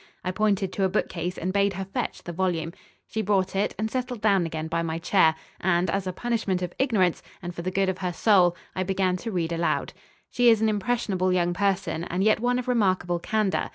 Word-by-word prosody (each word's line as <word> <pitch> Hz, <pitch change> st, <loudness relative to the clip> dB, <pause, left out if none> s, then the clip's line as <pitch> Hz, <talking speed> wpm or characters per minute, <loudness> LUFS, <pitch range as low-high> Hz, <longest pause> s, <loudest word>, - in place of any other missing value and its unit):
I 185 Hz, -, 0 dB
pointed 200 Hz, -2 st, 0 dB
to 195 Hz, -, -1 dB
a 190 Hz, -, +3 dB
bookcase 180 Hz, -2 st, -2 dB
and 185 Hz, +2 st, -2 dB
bade 200 Hz, 0 st, +2 dB
her 190 Hz, +1 st, -4 dB
fetch 195 Hz, -, -4 dB
the 175 Hz, -, -6 dB
volume. 170 Hz, -2 st, -1 dB, 0.3 s
She 220 Hz, -, -3 dB
brought 195 Hz, -2 st, +1 dB
it 200 Hz, +2 st, 0 dB
and 220 Hz, +1 st, -2 dB
settled 250 Hz, -2 st, -3 dB
down 200 Hz, -5 st, +3 dB
again 160 Hz, 0 st, -4 dB
by 165 Hz, +1 st, -1 dB
my 165 Hz, -1 st, -2 dB
chair, 165 Hz, -2 st, +3 dB, 0.2 s
and, 175 Hz, -1 st, +1 dB
as 195 Hz, 0 st, -1 dB
a -, -, -1 dB
punishment 205 Hz, -3 st, -1 dB
of 175 Hz, -, -4 dB
ignorance, 210 Hz, -, +2 dB, 0.2 s
and 175 Hz, -1 st, -6 dB
for 170 Hz, -, -6 dB
the 180 Hz, -, -2 dB
good 195 Hz, +1 st, +1 dB
of 190 Hz, 0 st, -2 dB
her 180 Hz, -1 st, -1 dB
soul, 180 Hz, -1 st, +4 dB, 0.2 s
I 185 Hz, -, -1 dB
began 185 Hz, -1 st, +1 dB
to 225 Hz, +5 st, -5 dB
read 170 Hz, -3 st, -1 dB
aloud. 170 Hz, 0 st, -1 dB, 0.4 s
She 245 Hz, -1 st, +4 dB
is 225 Hz, -2 st, +5 dB
an 220 Hz, 0 st, +2 dB
impressionable 205 Hz, -3 st, 0 dB
young 175 Hz, -1 st, +1 dB
person 195 Hz, -3 st, 0 dB
and 180 Hz, +2 st, -1 dB
yet 215 Hz, +1 st, +4 dB
one 245 Hz, +2 st, +1 dB
of 250 Hz, -, -4 dB
remarkable 185 Hz, -7 st, +1 dB
candour. 215 Hz, +1 st, 0 dB
190 Hz, 225 wpm, -26 LUFS, 175-210 Hz, 0.4 s, is